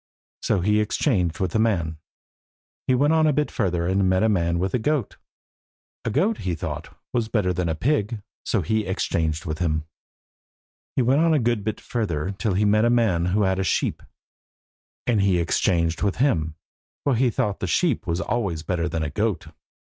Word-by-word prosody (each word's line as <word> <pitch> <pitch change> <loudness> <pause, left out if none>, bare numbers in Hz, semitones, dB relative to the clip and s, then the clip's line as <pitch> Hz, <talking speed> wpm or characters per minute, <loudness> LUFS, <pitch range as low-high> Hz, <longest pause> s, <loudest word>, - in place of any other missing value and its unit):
So 100 - +1
he 105 +3 +2
exchanged 105 - 0
with 95 -3 0
the 110 - +1
man. 85 -8 0 0.9
He 130 - +4
went 145 +5 +3
on 160 -1 +4
a 150 - +3
bit 150 +2 0
further, 90 -6 0
and 95 +1 +2
met 95 +2 +2
a 110 - +3
man 85 -4 +1
with 95 +2 -1
a 125 - +2
goat. 140 -1 -1 0.9
A - - +1
goat, 205 - +1
he 90 -2 -2
thought, - - -6 0.2
was 120 -3 0
better 105 -5 +1
than 90 -1 -1
a 80 - 0
pig. 110 - 0 0.2
So - - 0
he 110 -2 0
exchanged 80 -3 -1
with 80 -1 -3
him. 80 -3 0 1.1
He 130 - +2
went 135 +5 +3
on 165 -1 +4
a - - +3
good 120 -3 0
bit 110 0 -3
further 95 -7 -2
till 100 0 -1
he 105 +3 +2
met 105 +1 +4
a 120 - +4
man 110 -8 +2
who 100 +4 +1
had 95 -1 +1
a - - +1
sheep, - - 0 1.0
and 115 -5 +2
he 95 -2 +3
exchanged 85 -1 +1
with 100 -2 +1
him, 80 - +1 0.5
for 140 - +2
he 125 +2 +3
thought 105 -3 -1
a 95 - -1
sheep 140 - +1
was 85 +1 0
always 95 -10 -2
better 85 -1 -1
than 80 -1 -2
a 75 - -3
goat. 105 0 -1
100 Hz, 195 wpm, -24 LUFS, 85-115 Hz, 1.1 s, He